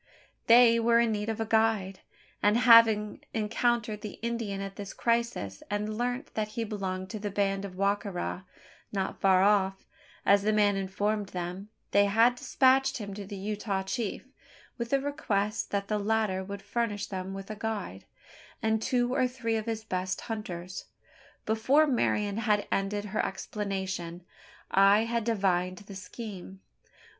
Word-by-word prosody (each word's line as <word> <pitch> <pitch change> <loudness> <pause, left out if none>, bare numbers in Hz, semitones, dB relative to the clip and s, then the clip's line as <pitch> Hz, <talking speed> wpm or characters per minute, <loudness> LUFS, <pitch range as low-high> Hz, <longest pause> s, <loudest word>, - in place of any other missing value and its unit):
They 230 0 +7
were 230 0 +4
in 235 -1 +3
need 210 0 -2
of 225 - -3
a 225 - 0
guide; 220 -4 +1 0.4
and 210 +2 +4
having 230 -3 +6
encountered 225 0 0
the 210 - -7
Indian 230 -4 -2
at 195 0 -6
this 200 -1 -7
crisis, 230 - -1
and 210 +1 -2
learnt 245 +4 -3
that 215 -1 -1
he 230 - 0
belonged 190 -3 -4
to 215 - -5
the 205 0 -3
band 195 0 0
of 185 -2 -8
Wa 200 +1 +3
ka 205 - -7
ra 180 0 -4 0.5
not 195 -2 -3
far 190 -1 +5
off, 195 -2 +2 0.4
as 200 0 +5
the 215 +2 +1
man 205 -1 +3
informed 200 +2 -1
them 180 +3 -5 0.2
they 200 0 +5
had 225 +4 +4
despatched 265 +2 +3
him 205 -4 -6
to 200 -1 -7
the 200 - -6
Utah 200 0 -2
chief, 195 +4 -3 0.5
with 235 -1 -5
a 275 - +4
request 215 -7 -1
that 200 0 -2
the 210 0 0
latter 210 -2 0
would 200 0 -7
furnish 205 -1 -2
them 190 0 -5
with 195 +2 -7
a - - -5
guide, 210 - -4 0.5
and 220 0 +1
two 245 +1 +1
or 255 -1 +2
three 245 -3 -2
of 220 0 -3
his 220 -1 -3
best 185 -3 -3
hunters. 185 -5 -6 0.6
Before 255 +8 +3
Marian 210 -6 0
had 210 -2 +1
ended 205 +1 -1
her 210 +1 -1
explanation, 190 -4 -4 0.5
I 195 +2 +6
had 230 0 -1
divined 185 -5 0
the 200 0 -11
scheme. 195 -2 -8
210 Hz, 165 wpm, -29 LUFS, 195-225 Hz, 0.6 s, They